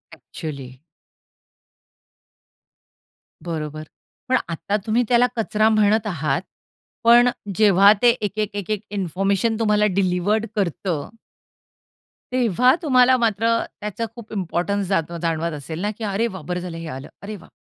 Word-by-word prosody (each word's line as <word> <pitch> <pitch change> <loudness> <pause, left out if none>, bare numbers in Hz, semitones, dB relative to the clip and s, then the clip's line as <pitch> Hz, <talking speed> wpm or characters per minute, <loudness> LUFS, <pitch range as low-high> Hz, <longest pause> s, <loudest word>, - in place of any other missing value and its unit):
Actually. 140 -2 -8 2.7
बरोबर. 155 -2 -5 0.5
पण 255 - +4
आता 200 +5 -2
तुम्ही 230 +3 +2
त्याला 245 0 +5
कचरा 215 0 +2
म्हणत 215 0 +3
आहात 155 -4 -1 0.6
पण 240 +1 +7 0.3
जेव्हा 200 -1 +6
ते 240 - +6
एक-एक, 210 0 -2
एक-एक 205 +1 -2
इन्फॉर्मेशन 195 +3 0
तुम्हाला 210 -1 +3
डिलिव्हर्ड 200 +3 +1
करतं 175 -5 -2 1.2
तेव्हा 250 +1 +3
तुम्हाला 255 -4 +5
मात्र 225 -1 +1 0.3
त्याचा 210 +2 -3
खूप 230 -2 -11
इम्पोर्टन्स 195 +1 -1
जात 170 -4 0
जाणवत 165 0 -1
असेल 160 +4 -7
ना, 210 +1 -1
की 225 - -7
"अरे 210 +3 0
वाह! 190 -5 -8
बरं 180 0 -2
झालं 175 -2 -6
हे 165 -1 -7
आलं." 135 - -9
"अरे 210 +1 -6
वाह! 185 - -14
200 Hz, 125 wpm, -22 LUFS, 170-220 Hz, 2.7 s, पण